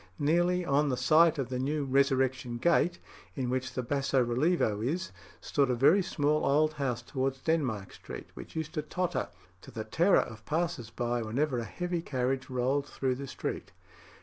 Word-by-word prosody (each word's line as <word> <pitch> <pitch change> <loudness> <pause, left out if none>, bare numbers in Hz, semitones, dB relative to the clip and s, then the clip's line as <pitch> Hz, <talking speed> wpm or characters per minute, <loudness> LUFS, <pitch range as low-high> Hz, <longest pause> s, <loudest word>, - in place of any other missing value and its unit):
Nearly 175 +4 +2
on 145 0 +2
the 130 - 0
site 165 +3 +5
of 135 -3 -2
the 125 -1 -2
new 145 +3 -1
"Resurrection 130 -2 +1
Gate," 175 +4 +2 0.4
in 125 -3 -2
which 130 0 -2
the 125 - -1
basso 135 0 +1
relievo 120 - +1
is, 155 - -2 0.3
stood 140 -2 +1
a 125 - +2
very 150 +11 +5
small 150 -3 0
old 155 +2 +3
house 130 -5 -2
towards 135 +1 -2
Denmark 130 -12 -1
Street, - - -9
which - - -11
used 160 0 -4
to 155 - -1
totter, 180 +2 -2 0.3
to - - -13
the 110 -1 -5
terror 165 - +3
of 110 -1 -9
passers 155 -6 -2
by, 120 +1 -2
whenever 125 +4 0
a 115 - -4
heavy 175 +3 -3
carriage 130 -3 -2
rolled 130 +3 0
through 130 -1 -1
the 135 +2 -6
street." - - -5
140 Hz, 175 wpm, -30 LUFS, 125-155 Hz, 0.4 s, site